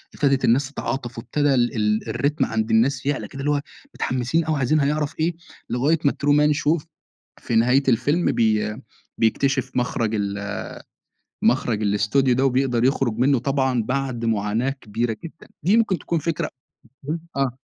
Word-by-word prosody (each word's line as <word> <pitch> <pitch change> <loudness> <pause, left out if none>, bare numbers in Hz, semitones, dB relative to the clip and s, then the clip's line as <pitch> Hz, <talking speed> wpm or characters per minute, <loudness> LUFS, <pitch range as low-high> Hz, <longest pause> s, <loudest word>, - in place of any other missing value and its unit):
ابتدت 135 -2 +2
الناس 130 +4 +2
تتعاطف 125 -4 -4
وابتدا 145 +4 +1
ال 120 -1 +1
ال 105 0 0
الريتم 145 +2 0
عند 110 -1 -2
الناس 125 +4 +2
يعلى 145 -1 -1
كده 140 - -10
اللي 145 +2 0
هو 145 -1 +1 0.3
متحمسين 130 +6 0
أوي 155 -1 0
عايزين 140 +3 +2
هيعرف 150 +1 0
إيه 165 +2 +1 0.3
لغاية 145 +7 +1
ما 140 - +5
الترومان 150 +1 +3
شو 155 +2 +1 0.6
في 115 - -3
نهاية 125 +5 +4
الفيلم 140 +8 +2
بي 110 -2 +1 0.4
بيكتشف 130 +4 +1
مخرَج 115 -3 0
ال 100 -1 -3 0.9
مخرَج 110 -3 +2
الأستوديو 105 +6 +2
ده 130 +2 +1
وبيقدَر 125 -2 +1
يخرُج 130 -4 +1
منُّه 135 +2 +3
طبعًا 130 -1 0
بعد 130 0 -2
معاناة 110 +3 0
كبيرة 115 -3 -3
جدًا. 165 0 -11 0.2
دي 195 +6 +4
ممكن 210 -6 +1
تكون 170 +3 -2
فكرة 165 0 -2 0.9
آه. 130 -2 0
130 Hz, 150 wpm, -23 LUFS, 115-145 Hz, 0.9 s, ما